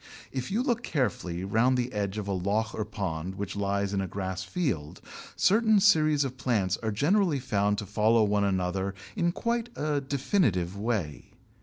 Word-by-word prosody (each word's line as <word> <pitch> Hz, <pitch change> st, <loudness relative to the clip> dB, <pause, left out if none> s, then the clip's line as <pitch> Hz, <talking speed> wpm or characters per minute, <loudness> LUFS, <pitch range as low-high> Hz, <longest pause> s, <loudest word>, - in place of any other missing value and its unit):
If 130 Hz, -2 st, -4 dB
you 220 Hz, +6 st, 0 dB
look 240 Hz, -3 st, 0 dB
carefully 95 Hz, -, -2 dB
round 115 Hz, +6 st, +2 dB
the 125 Hz, 0 st, -2 dB
edge 100 Hz, -1 st, -2 dB
of 105 Hz, -2 st, -4 dB
a -, -, -1 dB
loch 100 Hz, +4 st, 0 dB
or 110 Hz, -, -2 dB
pond 95 Hz, -4 st, -4 dB
which 100 Hz, 0 st, -5 dB
lies 100 Hz, 0 st, -1 dB
in 100 Hz, -, 0 dB
a 95 Hz, -, -2 dB
grass 95 Hz, 0 st, -4 dB
field, 95 Hz, -, -3 dB, 0.4 s
certain 220 Hz, +2 st, +4 dB
series 155 Hz, -7 st, +4 dB
of 130 Hz, -1 st, -5 dB
plants 105 Hz, -8 st, +1 dB
are 110 Hz, -, -3 dB
generally 165 Hz, -, +2 dB
found 105 Hz, -5 st, 0 dB
to 105 Hz, -, -4 dB
follow 110 Hz, +3 st, +3 dB
one 105 Hz, -1 st, +2 dB
another 95 Hz, 0 st, -1 dB, 0.2 s
in 175 Hz, -4 st, +1 dB
quite 235 Hz, +4 st, -2 dB
a 150 Hz, -1 st, -1 dB
definite 135 Hz, -, 0 dB
way. 100 Hz, -8 st, -2 dB
105 Hz, 175 wpm, -28 LUFS, 95-145 Hz, 0.4 s, certain